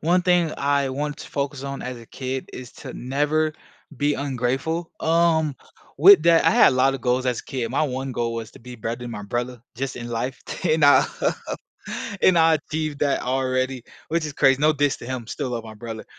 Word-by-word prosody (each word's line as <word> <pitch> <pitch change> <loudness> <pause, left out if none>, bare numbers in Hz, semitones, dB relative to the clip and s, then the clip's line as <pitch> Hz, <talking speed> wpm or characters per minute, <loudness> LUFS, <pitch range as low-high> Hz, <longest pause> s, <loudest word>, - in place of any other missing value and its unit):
one 175 +3 +2
thing 175 -3 +2
I 140 -1 +1
want 145 +2 -3
to - - -9
focus 140 -1 -3
on 140 0 -5
as 125 -1 -5
a 115 - -12
kid 130 +1 -5
is 125 -2 -9
to - - -9
never 150 +5 0 0.4
be 145 +1 +1
ungrateful, 140 +5 -2
um, 160 -3 +2 0.4
with 185 +2 +9
that 170 -1 +5
I - - +6
had 235 - +6
a - - -1
lot 135 +1 +3
of 135 - -5
goals 125 +1 0
as 125 -2 0
a - - -24
kid. 125 -5 -3
My 135 - +1
one 135 -2 -2
goal 115 -1 -2
was 115 -1 -5
to - - -14
be 125 +1 -10
better 115 +1 -3
than 120 -1 -6
my 105 - -6
brother, 120 +3 -3
just 135 +2 -4
in 120 -1 -6
life, 120 +2 -3 0.2
and 155 -3 +3
I 145 - +7 1.2
and 185 -2 +5
I 165 0 +5
achieved 155 -1 -4
that 140 -1 +1
already, 130 0 -1 0.3
which 165 0 0
is 150 - -6
crazy. 135 -1 +3
No 155 +1 +5
diss 145 -1 +1
to - - -9
him, 130 -2 -4
still 130 +2 -4
love 115 -2 -4
my 110 - -9
brother. 110 0 -7
135 Hz, 215 wpm, -23 LUFS, 125-155 Hz, 1.2 s, with